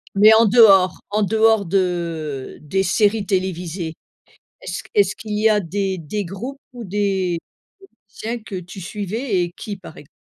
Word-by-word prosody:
Mais 210 +2 +7
en 225 +1 +6
dehors 195 -5 +6
en 210 +1 +1
dehors 220 0 +3
de 170 -6 -2
des 190 +6 -1
séries 205 +2 +2
télévisées, 180 -3 -2 0.7
est-ce - - -5
q - - -19
est-ce 410 -1 +3
qu'il 210 -1 -5
y 220 +1 +4
a 210 - +3
des 195 +1 -2
des 180 +6 -4
groupes 220 +10 -7
ou 240 -2 -8
des 190 -3 -1 0.7
musiciens 230 +3 -5
que 200 - -7
tu 180 +2 -10
suivais 205 +1 -2
et 175 - -5
qui 205 -2 -6
par 180 -4 -12
ex 145 - -14
195 Hz, 165 wpm, -21 LUFS, 180-215 Hz, 0.7 s, Mais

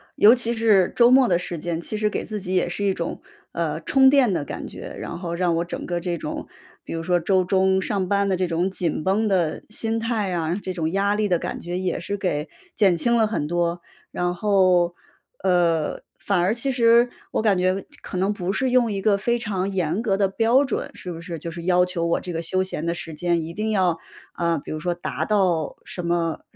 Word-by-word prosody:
尤 215 +3 +7
其 235 -1 +1
是 215 -5 +3
周 240 0 +6
末 260 -1 +6
的 175 -5 +3
时 175 -1 -5
间， 170 0 -3
其 215 - -4
实 210 0 +1
给 - - -3
自 215 -1 -4
己 185 -1 -3
也 180 - +2
是 200 +3 -3
一 195 -1 +2
种， - - -4 0.3
呃， - - -2
充 265 -1 +5
电 265 -6 +4
的 150 - -1
感 - - -6
觉。 - - -9
然 - - -5
后 170 -2 -4
让 175 -2 +1
我 170 - 0
整 175 - -6
个 175 -1 -2
这 175 -1 -3
种 - - -5 0.4
比 - - -7
如 165 - -3
说 175 +1 +2
周 185 +2 +2
中 190 +1 +2
上 190 -2 -1
班 200 0 +2
的 190 - +2
这 185 -1 0
种 175 +3 0
紧 170 -4 -1
绷 205 +5 +1
的 180 -6 0
心 225 +1 -1
态 225 -4 -1
啊， 165 0 -1
这 185 - -3
种 160 -3 -1
压 200 +1 +1
力 210 0 +1
的 180 -3 +2
感 - - -4
觉 175 +1 -4
也 185 0 -2
是 200 +3 -4
给 155 -5 -2 0.3
减 195 -5 +4
轻 235 +6 +2
了 220 - +3
很 210 -9 -2
多。 175 0 -1 0.3
然 175 0 -1
后， 185 -3 +3 0.5
呃， 170 -4 +1 0.2
反 200 -3 0
而 180 +4 +2
其 255 +4 -1
实 235 0 +4 0.2
我 - - 0
感 205 -4 +3
觉 185 +1 +1 0.2
可 - - -7
能 190 +3 +1
不 190 -2 -2
是 260 +3 0
用 245 -3 +3
一 195 - -2
个 200 -1 +3
非 235 +4 0
常 195 -5 -2
严 180 +2 -1
格 205 -5 +1
的 195 0 +2
标 230 +7 +3
准， 265 - -3
是 180 - -7
不 165 - -7
是？ 170 -1 -6
就 170 - -6
是 170 +1 -7
要 180 0 +4
求 180 -2 -2
我 170 - +1
这 180 - -6
个 165 0 -3
休 185 +3 0
闲 175 -4 -3
的 170 - 0
时 165 -2 -7
间 170 0 0
一 165 - -6
定 215 +1 -1
要， 180 -5 +2 0.4
啊， 170 -2 0
比 - - -12
如 155 - -3
说 175 +1 -1
达 155 -3 -4
到 180 -7 +1
什 180 -2 -6
么 170 -2 0
185 Hz, 255 characters per minute, -23 LUFS, 170-210 Hz, 0.5 s, 尤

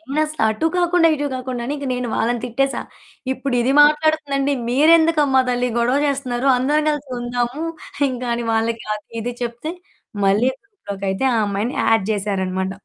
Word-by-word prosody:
నేనసల 310 0 -1
అటు 220 +9 -2
కాకుండా, 350 -1 +3
ఇటు 290 0 -3
కాకుండా 255 -1 -4
అని 285 - -2
ఇంక 280 - -6
నేను 250 -1 -3
వాళ్ళని 235 +1 0
తిట్టేసా. 270 +3 -1 0.5
ఇప్పుడు 260 -1 -3
ఇది 255 +3 +1
మాట్లాడుతుందండి 295 -2 +2 0.2
మీరెందుకమ్మా 300 -1 +4
తల్లి 250 0 0
గొడవ 245 +4 +2
జేస్తున్నారు. 270 -2 -1
అందరం 295 +4 +1
కలిసి 295 -2 -3
ఉందాము 240 +4 -2 0.5
ఇంకని 240 -2 -3
వాళ్ళకి 225 0 0
అది, 210 -1 -7
ఇది 240 +2 -4
చెప్తే 240 +7 -4 0.5
మళ్ళీ 210 +6 +3
గ్రూప్‌లోకైయితే 200 - -4
ఆ - - +1
అమ్మాయిని 205 +5 -2
యాడ్ 225 -3 +3
జేసారన్నమాట. 190 -2 -2
250 Hz, 145 wpm, -20 LUFS, 230-290 Hz, 0.5 s, మీరెందుకమ్మా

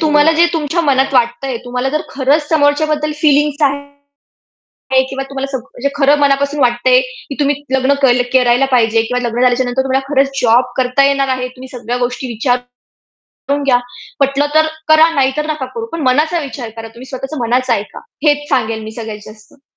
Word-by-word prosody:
तुम्हाला 305 0 +4
जे 335 +2 +4
तुमच्या 325 +1 -1
मनात 270 -3 +1
वाटतंय, 245 +1 0
तुम्हाला 250 +2 -2
जर - - -1
खरंच 285 +3 0
समोरच्या 290 -1 +2
बद्दल 305 0 -1
फीलिंग्स 295 0 +2
आहेत 285 0 -4 0.9
किंवा 270 0 -4
तुम्हाला 275 0 -3
सग 265 - -1
म्हणजे 270 0 -4
खरं 285 +1 +4
मनापासून 280 +1 +1
वाटतंय, 250 - +3
की - - -9
तुम्ही 285 0 +2 0.2
लग्न 265 +1 +2
के 245 -1 +4 0.2
करायला 245 +1 +3
पाहिजे. 225 -2 +3
किंवा 250 +2 -2
लग्न 235 +2 -3
झाल्याच्यानंतर 250 +1 +1
तुम्हाला 270 0 -1
खरंच 275 0 +1
जॉब 240 +2 +4
करता 260 +2 +2
येणार 275 -1 +1
आहे. 255 -1 -2
तुम्ही 255 +1 -12
सगळ्या 245 -1 -5
गोष्टी 245 +1 -3
विचार 245 +2 0 0.9
करून 285 0 0
घ्या. 255 -3 +3 0.4
पटलं 275 +1 +2
तर 315 0 +4 0.2
करा 315 +1 +6
नाही 270 -2 +2
तर 300 0 -1
नका 305 -4 -3
करू. 460 - -6
पण 330 - -4
मनाचा 305 +6 +2
विचार 260 -5 -7
करा. 225 0 -7
तुम्ही 235 +3 -13
स्वतःच 270 +2 -6
मनाचं 245 +2 +1
ऐका. 205 +1 -6 0.3
हेच 290 0 +2
सांगेल 225 -5 -1
मी 220 - -7
सगळ्यात 220 -2 -6
जास्त. 215 +5 -18
270 Hz, 180 wpm, -15 LUFS, 250-290 Hz, 0.9 s, करा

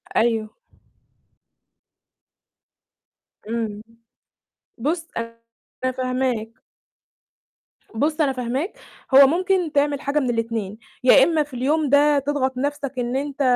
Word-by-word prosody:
أيوه. 225 -2 +1 3.0
إمم. 220 -3 -3 1.0
بُص 325 +7 -2
أنا 230 +2 -6
فاهماك. 255 -3 -1 1.4
بُص 305 +6 0
أنا 275 -3 +2
فاهماك، 255 - -3 0.4
هو 275 0 +10
ممكن 360 0 +1
تعمل 285 -1 +1
حاجة 290 +1 0
من 255 -3 -1
ال2 225 -3 -2 0.3
يا 265 +1 +7
إمّا 315 -1 +2
في 290 -2 -17
اليوم 290 +4 0
ده 290 0 +4
تضغط 265 -2 -1
نَفْسك 285 0 -2
إن 245 +1 -2
أنت 280 +1 -3
265 Hz, 100 wpm, -22 LUFS, 235-290 Hz, 3.0 s, هو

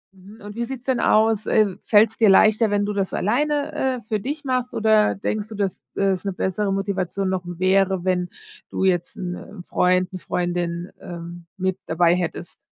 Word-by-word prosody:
Mhm, 200 +4 -15
und 205 +1 -9
wie 235 0 -2
sieht's 255 -1 -7
denn 260 -2 +1
aus, 220 0 +3
äh, 210 -4 +3
fällt's 220 +1 +4
dir 220 -3 +5
leichter, 215 +3 +5
wenn 205 0 +1
du 210 - -2
das 195 -2 -2
alleine, 290 +8 0
äh, 260 -4 -1
für 215 -2 -1
dich 290 +8 -5
machst, 255 -1 -1
oder 215 -1 +3
denkst 210 +2 -3
du, 220 - -8
dass 195 -2 -2
es 195 -1 +1
'ne 195 -2 -2
bessere 195 +2 -1
Motivation 195 -1 -1
noch 185 -1 -1
wäre, 185 +1 +1
wenn 180 -1 0 0.4
du - - -2
jetzt 175 -2 +1
'n, 180 -1 -4
äh, 195 -3 -10
Freund, 180 0 +2
'ne 185 - -5
Freundin, 175 0 -2
ähm, 170 0 -8
mit 190 0 -1
dabei 170 +1 +3
hättest? 175 -1 -4
195 Hz, 190 wpm, -22 LUFS, 180-215 Hz, 0.4 s, dir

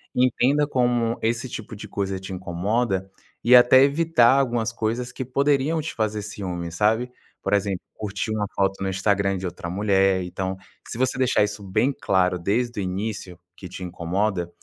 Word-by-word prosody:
entenda 130 +3 +2
como 120 -4 +1
esse 115 +3 -1
tipo 110 -1 -7
de 105 +1 -9
coisa 100 -1 -3
te 95 0 -7
incomoda 95 +3 -1 0.3
e 125 +2 +7
até 125 +1 +8
evitar 140 -3 +4
algumas 120 -4 0
coisas 115 +2 -2
que 130 - -5
poderiam 140 +4 +1
te 155 - -5
fazer 110 -1 -1
ciúmes, 90 -5 -5
sabe? 110 +6 +1 0.3
Por - - -1
exemplo, 100 -2 0
curtir 105 0 -4
uma 110 -1 -1
foto 95 0 0
no 95 - -1
Instagram 100 0 +1
de 95 - -5
outra 85 -1 -5
mulher. 95 0 +2
Então, 95 +1 -4 0.3
se - - -6
você 130 0 0
deixar 130 -4 +3
isso 105 0 -3
bem 110 +8 +1
claro 90 -1 +1
desde 115 +6 -1
o - - -1
início, 95 -1 -4 0.2
que 95 - -8
te 90 - -8
incomoda, 90 +1 -2
105 Hz, 170 wpm, -24 LUFS, 95-120 Hz, 0.3 s, até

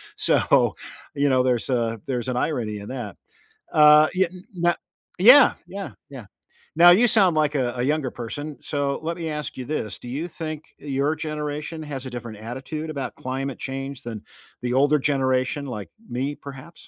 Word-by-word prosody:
So, - - +3 0.4
you 145 0 +1
know, 130 -1 +3
there's 125 -1 0
a 115 -3 0
there's 125 -2 -2
an 125 - -1
irony 115 -8 -1
in 100 - -9
that. 120 -7 -5 0.6
Uh, 150 0 +8
yeah 185 0 +2
n 180 +2 -13 0.2
n 175 - -6
no 175 0 +3 0.4
yeah! 250 +9 +8
Yeah, 195 +2 -6 0.2
yeah. 130 -6 -9 0.5
Now, 175 +1 +9
you 225 +7 +6
sound 195 -7 +4
like 150 -1 +2
a 125 -2 0
a 120 - -1
younger 145 0 0
person, 145 +5 -6
so, 140 -1 -2
let 165 +1 -3
me 165 -2 -4
ask 150 -3 -5
you 130 - -5
this, 120 -8 -3
do 125 - -10
you 150 +8 -3
think 155 -2 -6 0.2
your 140 +1 0
generation 150 +1 -4
has 135 -3 -6
a - - -5
different 120 -3 -7
attitude 130 +8 -6
about 140 -3 -4
climate 130 +1 -4
change 135 0 -5
than 115 -3 -6 0.4
the 125 - -1
older 145 +3 +4
generation, 135 0 0
like 110 -6 -6 0.2
me, 135 +4 -2
perhaps? 140 +4 -11
140 Hz, 180 wpm, -24 LUFS, 125-155 Hz, 0.6 s, Now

